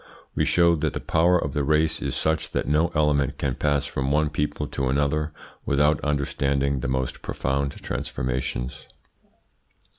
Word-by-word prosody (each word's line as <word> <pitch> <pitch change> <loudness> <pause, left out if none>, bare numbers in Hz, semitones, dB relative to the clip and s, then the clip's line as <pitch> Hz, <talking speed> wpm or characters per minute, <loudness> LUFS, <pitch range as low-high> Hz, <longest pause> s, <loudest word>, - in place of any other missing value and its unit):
We - - +1
showed 85 -3 +3
that - - 0
the - - -3
power 85 +2 +3
of 70 -5 -2
the 75 - 0
race 75 +2 +2
is - - -2
such 80 0 0
that - - -1
no 75 +3 +3
element 75 -3 +2
can 70 -2 -1
pass 70 +1 0
from 65 -1 -2
one 75 +1 +2
people 75 -1 -2
to 65 -1 -2
another 70 +3 0 0.3
without 75 +2 +2
undergoing 70 -1 0
the - - -3
most 65 0 -2
profound 70 +1 -1
transformations. 65 0 -3
70 Hz, 155 wpm, -25 LUFS, 70-75 Hz, 0.3 s, showed